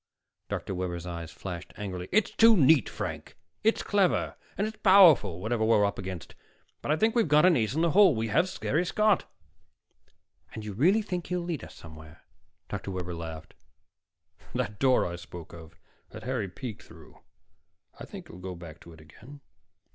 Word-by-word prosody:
Dr. -, -, -4 dB
Webber's 90 Hz, -2 st, -4 dB
eyes 85 Hz, -2 st, -6 dB
flashed 90 Hz, -3 st, -8 dB
angrily. 90 Hz, -3 st, -6 dB
"It's 215 Hz, +2 st, +2 dB
too 225 Hz, -1 st, +6 dB
neat, 150 Hz, -, +5 dB
Frank. -, -, -6 dB, 0.3 s
It's 225 Hz, +1 st, +2 dB
clever, 200 Hz, -3 st, +1 dB, 0.2 s
and 200 Hz, -, 0 dB
it's 215 Hz, 0 st, -6 dB
powerful, 170 Hz, -, +6 dB
whatever 110 Hz, +3 st, -1 dB
we've 110 Hz, 0 st, +4 dB
run 100 Hz, -1 st, +3 dB
up -, -, -9 dB
against. 95 Hz, -4 st, -7 dB, 0.5 s
But -, -, -2 dB
I -, -, +4 dB
think 220 Hz, +6 st, +2 dB
we've 230 Hz, -6 st, +3 dB
got 150 Hz, +2 st, +5 dB
an 185 Hz, -2 st, +5 dB
ace 115 Hz, +2 st, 0 dB
in 160 Hz, -, +1 dB
the 170 Hz, -1 st, +2 dB
hole. 190 Hz, -5 st, +6 dB
We 110 Hz, 0 st, -2 dB
have 165 Hz, -, +2 dB
Harry 160 Hz, +5 st, +1 dB
Scott." 210 Hz, +2 st, +1 dB, 1.2 s
"And 110 Hz, -1 st, -7 dB
you 105 Hz, -, -5 dB
really 185 Hz, -, +3 dB
think 180 Hz, -4 st, -4 dB
he'll 180 Hz, 0 st, -2 dB
lead 170 Hz, -7 st, -4 dB
us -, -, -11 dB
somewhere?" 80 Hz, 0 st, -13 dB, 0.4 s
Dr. -, -, -5 dB
Webber 90 Hz, -2 st, -4 dB
laughed. 80 Hz, -2 st, -8 dB, 1.0 s
"That 100 Hz, +1 st, -3 dB
door 130 Hz, 0 st, +3 dB
I 85 Hz, 0 st, -4 dB
spoke 85 Hz, -1 st, -11 dB
of 80 Hz, -2 st, -12 dB, 0.3 s
that 110 Hz, -, -10 dB
Harry 120 Hz, -5 st, -2 dB
peeked 115 Hz, +2 st, -7 dB
through, -, -, -16 dB, 0.8 s
I -, -, -7 dB
think -, -, -10 dB
he'll 90 Hz, -, -12 dB
go 90 Hz, 0 st, -6 dB
back 85 Hz, -3 st, -11 dB
to 85 Hz, -, -14 dB
it 80 Hz, -, -15 dB
again. 120 Hz, -, -15 dB
110 Hz, 185 wpm, -28 LUFS, -, 1.2 s, too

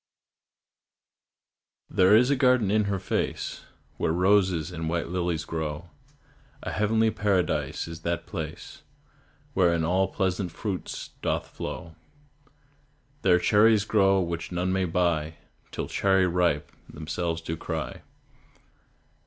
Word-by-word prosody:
There 95 Hz, +1 st, +5 dB
is 125 Hz, +5 st, +5 dB
a -, -, +4 dB
garden 125 Hz, -6 st, +3 dB
in 105 Hz, 0 st, +3 dB
her 100 Hz, -1 st, -1 dB
face -, -, -3 dB, 0.3 s
Where -, -, 0 dB
roses 90 Hz, -2 st, +2 dB
and 80 Hz, -2 st, -4 dB
white 85 Hz, 0 st, -2 dB
lilies 85 Hz, -2 st, -1 dB
grow; 80 Hz, +1 st, -4 dB, 0.7 s
A -, -, -3 dB
heavenly 110 Hz, +2 st, +2 dB
paradise 100 Hz, -5 st, 0 dB
is 85 Hz, 0 st, -8 dB
that 85 Hz, +1 st, -2 dB
place 80 Hz, -6 st, -7 dB, 0.7 s
Wherein 85 Hz, -3 st, +3 dB
all 95 Hz, +3 st, +2 dB
pleasant 95 Hz, -1 st, -1 dB
fruits 95 Hz, +1 st, -5 dB
doth -, -, -1 dB
flow. 80 Hz, -, -6 dB, 1.3 s
There 90 Hz, -2 st, +5 dB
cherries 105 Hz, +3 st, +4 dB
grow 95 Hz, -3 st, +3 dB
which 85 Hz, 0 st, -4 dB
none 90 Hz, +1 st, -1 dB
may 95 Hz, -1 st, +1 dB
buy, 80 Hz, -3 st, 0 dB, 0.3 s
Till -, -, -4 dB
"Cherry 95 Hz, -1 st, +2 dB
ripe" 85 Hz, -5 st, +1 dB, 0.2 s
themselves 80 Hz, +2 st, -3 dB
do 80 Hz, 0 st, -4 dB
cry. -, -, -5 dB
90 Hz, 120 wpm, -26 LUFS, 85-100 Hz, 1.3 s, There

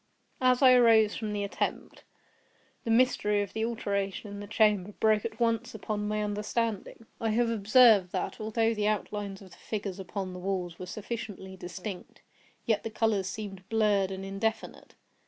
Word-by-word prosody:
As 255 Hz, +1 st, +4 dB
I 255 Hz, -1 st, +8 dB
arose 225 Hz, -3 st, +5 dB
from 215 Hz, -2 st, -4 dB
the 205 Hz, -1 st, -2 dB
attempt, 200 Hz, -, -4 dB, 0.8 s
the -, -, -3 dB
mystery 225 Hz, -4 st, +3 dB
of 200 Hz, -, -9 dB
the 220 Hz, -, -2 dB
alteration 200 Hz, -3 st, -2 dB
in 205 Hz, -, -7 dB
the 205 Hz, -, -7 dB
chamber 210 Hz, -2 st, +2 dB
broke 215 Hz, -1 st, +3 dB
at 225 Hz, 0 st, -5 dB
once 230 Hz, -2 st, 0 dB
upon 210 Hz, -1 st, -3 dB
my 210 Hz, 0 st, -1 dB
understanding. 210 Hz, +1 st, -3 dB
I 225 Hz, -, 0 dB
have 230 Hz, +2 st, +2 dB
observed 215 Hz, -3 st, +5 dB
that, -, -, -3 dB
although 225 Hz, +1 st, +1 dB
the 210 Hz, -1 st, 0 dB
outlines 205 Hz, -2 st, -3 dB
of 190 Hz, -, -15 dB
the -, -, -15 dB
figures 205 Hz, -3 st, -5 dB
upon 190 Hz, 0 st, -5 dB
the 180 Hz, -, -7 dB
walls 180 Hz, -2 st, -3 dB
were 185 Hz, -, -6 dB
sufficiently 205 Hz, -2 st, -6 dB
distinct, 180 Hz, +1 st, -8 dB, 0.4 s
yet 220 Hz, -3 st, +1 dB
the 225 Hz, -, -4 dB
colors 215 Hz, -3 st, 0 dB
seemed 195 Hz, -3 st, -7 dB
blurred 210 Hz, -4 st, +2 dB
and 190 Hz, 0 st, -6 dB
indefinite. 210 Hz, +3 st, -4 dB
210 Hz, 170 wpm, -29 LUFS, 195-225 Hz, 0.8 s, I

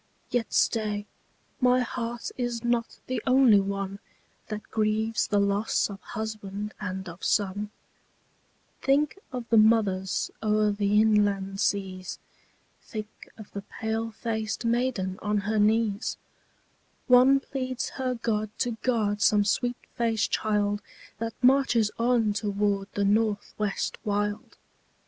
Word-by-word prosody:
Yet 240 Hz, -2 st, 0 dB
stay, 210 Hz, -2 st, +1 dB, 0.5 s
my 250 Hz, -1 st, +4 dB
heart 240 Hz, -1 st, -4 dB
is 240 Hz, -2 st, -2 dB
not 240 Hz, -1 st, 0 dB
the 255 Hz, -3 st, -2 dB
only 255 Hz, -5 st, +6 dB
one 195 Hz, 0 st, -3 dB, 0.5 s
That 215 Hz, -1 st, -5 dB
grieves 220 Hz, +1 st, +1 dB
the 205 Hz, -, +2 dB
loss 200 Hz, +1 st, +1 dB
of 195 Hz, -1 st, -9 dB
husband 210 Hz, -1 st, -5 dB
and 190 Hz, -2 st, -4 dB
of 170 Hz, +2 st, -10 dB
son; 205 Hz, 0 st, 0 dB, 1.1 s
Think 290 Hz, +6 st, +2 dB
of 250 Hz, -3 st, -5 dB
the 225 Hz, -, +7 dB
mothers 210 Hz, -4 st, +2 dB
o'er 215 Hz, -1 st, +2 dB
the 205 Hz, 0 st, +2 dB
inland 205 Hz, -3 st, +2 dB
seas; 185 Hz, -3 st, -1 dB, 0.6 s
Think 215 Hz, -2 st, -8 dB
of 215 Hz, -2 st, -11 dB
the 200 Hz, -, -5 dB
pale 220 Hz, +2 st, -3 dB
faced 220 Hz, 0 st, -3 dB
maiden 230 Hz, -5 st, 0 dB
on 210 Hz, 0 st, 0 dB
her 215 Hz, +2 st, 0 dB
knees; 215 Hz, 0 st, +1 dB, 0.9 s
One 255 Hz, +2 st, +6 dB
pleads 255 Hz, -2 st, -3 dB
her 255 Hz, -1 st, -2 dB
God 215 Hz, -2 st, -1 dB
to 245 Hz, -, 0 dB
guard 210 Hz, -5 st, 0 dB
some 205 Hz, 0 st, +4 dB
sweet 245 Hz, +3 st, 0 dB, 0.2 s
faced 230 Hz, -2 st, 0 dB
child 205 Hz, -1 st, +1 dB, 0.4 s
That 230 Hz, 0 st, -3 dB
marches 250 Hz, -5 st, +4 dB
on 230 Hz, -3 st, +2 dB
toward 205 Hz, -1 st, 0 dB
the 200 Hz, -, 0 dB
North 210 Hz, 0 st, +1 dB
West 210 Hz, -2 st, -2 dB
wild. 205 Hz, 0 st, -2 dB
215 Hz, 125 wpm, -27 LUFS, 205-235 Hz, 1.1 s, the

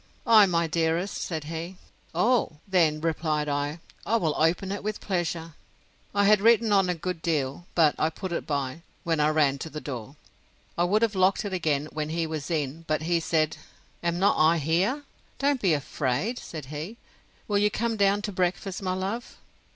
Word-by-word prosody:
I, 220 Hz, -4 st, +7 dB
my 170 Hz, -2 st, +1 dB
dearest, 165 Hz, +3 st, 0 dB
said 160 Hz, -4 st, -3 dB
he. 165 Hz, +4 st, -6 dB, 0.4 s
Oh! 225 Hz, +2 st, +2 dB
then, 165 Hz, -5 st, +2 dB
replied 155 Hz, -2 st, 0 dB
I, 145 Hz, +2 st, -2 dB, 0.2 s
I 225 Hz, -, 0 dB
will 165 Hz, -9 st, +1 dB
open 175 Hz, +4 st, +1 dB
it 200 Hz, -, -4 dB
with 215 Hz, 0 st, -3 dB
pleasure. 170 Hz, -3 st, -2 dB, 0.6 s
I 200 Hz, 0 st, +4 dB
had 210 Hz, 0 st, +5 dB
written 225 Hz, -1 st, +4 dB
on 195 Hz, -2 st, +4 dB
a 180 Hz, -, +1 dB
good 170 Hz, 0 st, -4 dB
deal; 155 Hz, 0 st, -1 dB
but 160 Hz, -4 st, +5 dB
I 155 Hz, -, +2 dB
put 180 Hz, +3 st, -6 dB
it 170 Hz, -, -3 dB
by, 140 Hz, +1 st, -2 dB, 0.2 s
when 165 Hz, -2 st, 0 dB
I 150 Hz, 0 st, +4 dB
ran 145 Hz, -3 st, +2 dB
to 160 Hz, -, -5 dB
the 155 Hz, -, -6 dB
door. 130 Hz, -2 st, -7 dB, 0.6 s
I 175 Hz, -, +2 dB
would 210 Hz, +5 st, +2 dB
have 225 Hz, -2 st, +2 dB
locked 190 Hz, +3 st, +2 dB
it 200 Hz, -, -4 dB
again, 155 Hz, -5 st, 0 dB
when 150 Hz, 0 st, -3 dB
he 165 Hz, +1 st, -1 dB
was 155 Hz, -1 st, -5 dB
in; 155 Hz, -1 st, -2 dB
but 155 Hz, 0 st, 0 dB
he 170 Hz, +1 st, +2 dB
said, 160 Hz, -1 st, 0 dB, 0.4 s
Am 170 Hz, 0 st, 0 dB
not 195 Hz, +3 st, +3 dB
I 160 Hz, +2 st, +5 dB
here? 180 Hz, -, +1 dB, 0.3 s
Don't 280 Hz, -2 st, +1 dB
be 185 Hz, -5 st, +3 dB
afraid. 145 Hz, -, -1 dB
Said 155 Hz, -4 st, -8 dB
he, 165 Hz, +10 st, -6 dB, 0.5 s
Will 205 Hz, -1 st, +2 dB
you 210 Hz, +1 st, +3 dB
come 230 Hz, +2 st, -1 dB
down 200 Hz, 0 st, +2 dB
to 210 Hz, -, -2 dB
breakfast, 185 Hz, +1 st, -1 dB
my 185 Hz, -1 st, -1 dB
love? 195 Hz, +6 st, -4 dB
170 Hz, 190 wpm, -27 LUFS, 155-200 Hz, 0.6 s, I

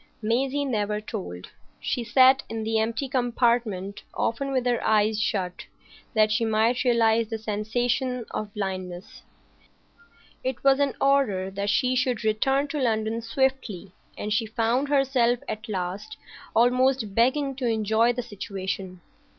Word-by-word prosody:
Maisie 260 Hz, +6 st, 0 dB
never 210 Hz, -5 st, -1 dB
told. 90 Hz, -, -7 dB, 0.3 s
She 245 Hz, -, -2 dB
sat 260 Hz, +3 st, +5 dB
in 225 Hz, -1 st, -4 dB
the 220 Hz, 0 st, 0 dB
empty 225 Hz, +5 st, -1 dB
compartment 235 Hz, -6 st, 0 dB
often 275 Hz, +4 st, -1 dB
with 255 Hz, -2 st, 0 dB
her 245 Hz, -1 st, +1 dB
eyes 215 Hz, 0 st, +2 dB
shut, 185 Hz, -4 st, -2 dB, 0.5 s
that 215 Hz, 0 st, +4 dB
she 225 Hz, +2 st, +1 dB
might 225 Hz, +2 st, +2 dB
realise 230 Hz, -2 st, +3 dB
the 225 Hz, -, -3 dB
sensation 240 Hz, +3 st, -1 dB
of 215 Hz, -1 st, -4 dB
blindness. 185 Hz, -3 st, -5 dB, 1.2 s
It 260 Hz, -1 st, -3 dB
was 275 Hz, 0 st, +5 dB
an 280 Hz, -2 st, +1 dB
order 245 Hz, -9 st, +2 dB
that 200 Hz, +1 st, -2 dB
she 255 Hz, +4 st, +2 dB
should 250 Hz, -3 st, 0 dB
return 270 Hz, +6 st, +1 dB
to 295 Hz, -, -3 dB
London 225 Hz, -1 st, 0 dB
swiftly, 230 Hz, -6 st, -1 dB, 0.3 s
and 210 Hz, 0 st, -2 dB
she 220 Hz, +1 st, 0 dB
found 230 Hz, +5 st, 0 dB
herself 265 Hz, -4 st, +3 dB
at 215 Hz, +1 st, -5 dB
last 200 Hz, +8 st, -4 dB, 0.4 s
almost 250 Hz, -2 st, +3 dB
beginning 265 Hz, +5 st, +2 dB
to 255 Hz, -3 st, -1 dB
enjoy 220 Hz, +1 st, +2 dB
the 245 Hz, 0 st, -4 dB
situation. 190 Hz, -4 st, -5 dB
230 Hz, 140 wpm, -25 LUFS, 210-255 Hz, 1.2 s, sat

